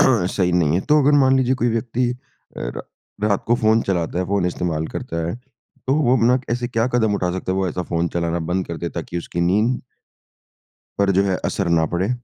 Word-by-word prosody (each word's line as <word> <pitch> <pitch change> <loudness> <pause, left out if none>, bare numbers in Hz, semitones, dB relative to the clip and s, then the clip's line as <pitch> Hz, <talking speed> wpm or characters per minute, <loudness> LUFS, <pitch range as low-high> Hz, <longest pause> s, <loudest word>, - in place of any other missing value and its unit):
सही 95 -7 +2
नहीं 85 -3 +2
है। 90 - +2
तो 150 0 +5
अगर 145 +2 +4
मान 135 -1 +4
लीजिए 130 0 +2
कोई 120 - +3
व्यक्ति 120 +2 0 0.5
अ, - - -7
रा - - -4 0.5
रात 100 -2 0
को 120 - +3
फ़ोन 110 -2 +3
चलाता 90 -3 -1
है 90 - 0
फ़ोन 100 -1 +1
इस्तेमाल 80 -3 -2
करता 85 0 -4
है, 85 - -2 0.5
तो 135 - +2
वो 130 -4 +3
अपना 125 +2 +3
ऐसे 120 +1 -1
क्या 115 -1 0
कदम 110 -4 +2
उठा 90 -3 0
सकता 95 0 -3
है? - - -1
वो 95 - 0
ऐसा 90 +2 -3
फ़ोन 85 0 -1
चलाना 85 0 -1
बंद 95 +1 0
कर 85 - -5
दे 85 - -3
ताकि 85 +1 -5
उसकी 85 0 -4
नींद 105 +8 +2 1.2
पर 100 -1 +3
जो 100 - +5
है 95 -2 +1
असर 95 - -1
ना 80 -1 +3
पड़े। 90 +5 0
95 Hz, 220 wpm, -21 LUFS, 85-120 Hz, 1.2 s, तो